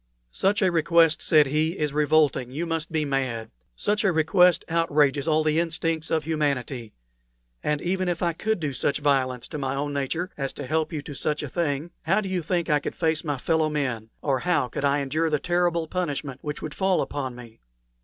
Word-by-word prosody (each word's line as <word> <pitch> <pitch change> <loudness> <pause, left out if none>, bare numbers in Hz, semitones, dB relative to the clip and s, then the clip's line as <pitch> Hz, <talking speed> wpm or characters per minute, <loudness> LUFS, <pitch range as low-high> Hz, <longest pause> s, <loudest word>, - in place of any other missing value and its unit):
"Such 200 - +1
a 185 - +3
request," 165 -1 +3
said 155 -2 +5
he, 155 +5 0
"is 150 -2 -1
revolting; 150 -4 +2
you 150 +7 -3
must 165 -1 -3
be 155 -1 0
mad. 130 -5 -2 0.2
Such 210 - 0
a 195 - +3
request 175 +2 +4
outrages 150 -4 +2
all 155 0 +3
the 155 +1 +2
instincts 165 -1 -1
of 160 -1 +1
humanity. 140 -7 -2 0.7
And 150 -1 0
even 185 +1 0
if 175 0 -2
I 170 -1 +1
could 220 +4 -1
do 150 -4 -2
such 140 +2 0
violence 135 -4 0
to 150 - -5
my 135 -1 -2
own 145 +1 -2
nature 160 +7 -2
as 135 -1 -2
to 145 - -7
help 155 +4 0
you 150 -3 -4
to 145 - -8
such 150 +2 -1
a 145 - -5
thing, 155 +1 -2
how 190 +6 +2
do 200 -3 -4
you 185 -2 -1
think 170 +1 -1
I 150 -1 +3
could - - -5
face 160 -1 0
my 145 -4 -2
fellow 160 +3 +1
men, 130 -7 -2
or 135 -3 +1
how 170 -7 +1
could 140 - -3
I 140 +1 +2
endure 155 +4 0
the 150 - +2
terrible 175 0 0
punishment 145 -6 -3
which 150 0 -5
would 155 - -5
fall 190 0 +1
upon 130 -4 -4
me?" 120 -2 -12
155 Hz, 210 wpm, -25 LUFS, 140-170 Hz, 0.7 s, said